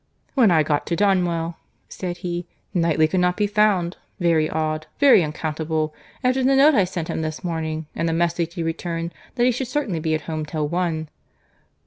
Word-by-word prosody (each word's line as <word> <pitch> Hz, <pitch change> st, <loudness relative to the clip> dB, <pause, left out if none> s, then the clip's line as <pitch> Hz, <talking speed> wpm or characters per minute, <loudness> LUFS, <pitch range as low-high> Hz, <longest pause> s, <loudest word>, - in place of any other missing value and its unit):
"When 250 Hz, -7 st, +5 dB
I 160 Hz, -3 st, +4 dB
got 150 Hz, -1 st, -1 dB
to 170 Hz, -, 0 dB
Donwell," 175 Hz, -4 st, +1 dB, 0.3 s
said 175 Hz, -2 st, -5 dB
he, 175 Hz, 0 st, -3 dB, 0.3 s
"Knightley 165 Hz, -3 st, +3 dB
could 185 Hz, +4 st, 0 dB
not 180 Hz, 0 st, +2 dB
be 210 Hz, -, +2 dB
found. 205 Hz, -4 st, +2 dB, 0.2 s
Very 165 Hz, -3 st, +2 dB
odd! 155 Hz, 0 st, -2 dB
very 275 Hz, -10 st, +6 dB
unaccountable! 155 Hz, 0 st, -2 dB, 0.3 s
after 255 Hz, +1 st, +2 dB
the 270 Hz, +1 st, +4 dB
note 285 Hz, +3 st, +6 dB
I 205 Hz, -8 st, +4 dB
sent 175 Hz, -3 st, -4 dB
him -, -, -2 dB
this 155 Hz, -1 st, -4 dB
morning, 160 Hz, -2 st, -3 dB
and 165 Hz, -, 0 dB
the -, -, 0 dB
message 170 Hz, 0 st, 0 dB
he 170 Hz, -, -2 dB
returned, 165 Hz, +1 st, -3 dB, 0.2 s
that 240 Hz, -1 st, +2 dB
he 250 Hz, -, +4 dB
should 250 Hz, +1 st, -3 dB
certainly 250 Hz, -, -1 dB
be 160 Hz, 0 st, 0 dB
at 155 Hz, -, -3 dB
home 155 Hz, 0 st, -4 dB
till 150 Hz, -1 st, -2 dB
one." 165 Hz, -1 st, -1 dB
170 Hz, 190 wpm, -23 LUFS, 160-190 Hz, 0.3 s, very